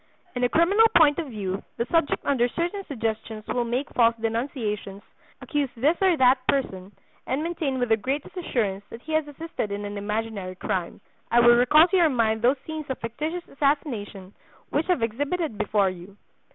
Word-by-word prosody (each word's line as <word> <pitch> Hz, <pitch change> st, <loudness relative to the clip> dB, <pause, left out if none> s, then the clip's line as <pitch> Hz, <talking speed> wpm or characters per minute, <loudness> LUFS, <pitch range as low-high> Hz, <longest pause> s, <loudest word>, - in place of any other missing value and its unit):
In 245 Hz, -, -1 dB
a 245 Hz, -, +3 dB
criminal 395 Hz, -, +5 dB
point 300 Hz, -1 st, +5 dB
of 325 Hz, -, -3 dB
view 200 Hz, -5 st, -4 dB, 0.2 s
the 235 Hz, -, 0 dB
subject 330 Hz, -3 st, +1 dB
under 250 Hz, -4 st, +2 dB
certain 345 Hz, -, -3 dB
suggestions 220 Hz, -3 st, -4 dB
will 245 Hz, -, -1 dB
make 245 Hz, +4 st, -2 dB
false 230 Hz, -1 st, +3 dB
denunciations, 220 Hz, -4 st, -3 dB, 0.4 s
accuse 290 Hz, -2 st, -1 dB
this 290 Hz, +8 st, +3 dB
or 370 Hz, -4 st, +4 dB
that 255 Hz, 0 st, +5 dB
person, 195 Hz, -9 st, -1 dB, 0.4 s
and 270 Hz, +4 st, -1 dB
maintain 320 Hz, -5 st, -2 dB
with 245 Hz, -2 st, -1 dB
the 225 Hz, -, +4 dB
greatest 270 Hz, -, -4 dB
assurance 215 Hz, -, -2 dB
that 230 Hz, -, -10 dB
he 315 Hz, -, -6 dB
has 310 Hz, -1 st, +1 dB
assisted 290 Hz, -7 st, -5 dB
at 200 Hz, -, -3 dB
an 205 Hz, -, -5 dB
imaginary 210 Hz, -2 st, -3 dB
crime. 185 Hz, -1 st, -3 dB, 0.3 s
I 240 Hz, -, +4 dB
will 240 Hz, 0 st, +7 dB
recall 300 Hz, +7 st, +6 dB
to 380 Hz, -, +1 dB
your 340 Hz, -3 st, +5 dB
mind 220 Hz, -4 st, +1 dB
those 250 Hz, +4 st, +3 dB
scenes 315 Hz, -2 st, -6 dB
of 265 Hz, -, -2 dB
fictitious 305 Hz, +10 st, -4 dB
assassination, 235 Hz, -, -2 dB, 0.4 s
which 300 Hz, +2 st, 0 dB
have 360 Hz, -10 st, +1 dB
exhibited 285 Hz, -, -2 dB
before 205 Hz, -2 st, +2 dB
you. 185 Hz, +2 st, -12 dB
245 Hz, 180 wpm, -25 LUFS, 215-305 Hz, 0.4 s, will